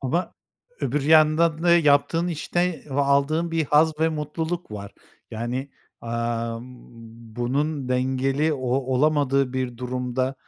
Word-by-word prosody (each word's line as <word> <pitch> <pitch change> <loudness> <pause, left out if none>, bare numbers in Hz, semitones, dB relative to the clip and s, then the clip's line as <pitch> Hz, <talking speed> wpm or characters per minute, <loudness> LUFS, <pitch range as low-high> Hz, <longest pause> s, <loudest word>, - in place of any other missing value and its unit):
Ama 160 +7 -2 0.5
öbür 150 - -1
yandan 155 +2 +4
da 175 - +3
yaptığın 165 +2 +3
işte 175 +1 -2
ve 135 +2 0
aldığın 140 +4 +1
bir 165 -1 0
haz 150 +2 +2
ve 160 - +4
mutluluk 160 +2 -4
var. 100 -1 -7 0.4
Yani, 120 +5 -4 0.3
amm, 115 0 -3 0.7
bunun 140 +3 -1
dengeli 130 +4 +1
o 130 -3 -4
olamadığı 135 +1 +1
bir 130 -2 -3
durumda, 125 +1 -2
140 Hz, 120 wpm, -24 LUFS, 125-155 Hz, 0.7 s, yandan